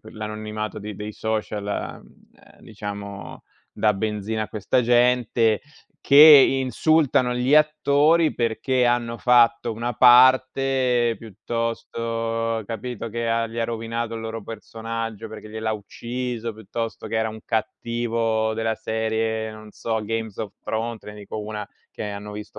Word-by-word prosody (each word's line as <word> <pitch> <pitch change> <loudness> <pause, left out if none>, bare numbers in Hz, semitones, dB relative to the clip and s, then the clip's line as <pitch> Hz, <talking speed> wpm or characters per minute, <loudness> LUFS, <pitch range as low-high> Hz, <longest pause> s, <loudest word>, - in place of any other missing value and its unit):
l'anonimato 110 0 -5
di 105 0 -7
dei 105 +2 -6
social, 110 -2 -3
uhm, 100 - -5 0.4
uhm, - - -22
diciamo, 100 -1 -8 0.3
dà 105 -1 +2
benzina 105 +1 -2
a 110 - -5
questa 110 +4 0
gente, 120 -2 +3 0.4
che 140 - +3
insultano 140 -2 +6
gli 125 +3 +2
attori 150 +1 +4
perché 125 +2 +1
hanno 120 -1 0
fatto 120 -1 +4
una 115 +2 -3
parte 130 0 +4
piuttosto 115 +1 -3
capito 115 +1 -5
che 115 +1 -2
ha 115 0 +1
gli 115 +1 -8
ha 115 - +1
rovinato 115 0 -3
il 115 - -5
loro 115 0 -5
personaggio 115 0 -6
perché 110 0 -10
gliel'ha 110 0 -2
ucciso, 120 +2 -5
piuttosto 110 +2 -5
che 115 - -3
era 110 0 +1
un 110 0 -8
cattivo 115 0 -1
della 110 0 -1
serie 110 0 -2
non 110 -1 -12
so, 110 -1 -2
Games 110 -1 -4
of 105 -3 -4
Thrones, 115 0 -3
te - - -9
ne 105 - -12
dico 105 +1 -8
una 105 -1 -5 0.2
che - - -6
hanno 105 0 -6
visto 105 0 -9
115 Hz, 140 wpm, -23 LUFS, 110-120 Hz, 0.4 s, insultano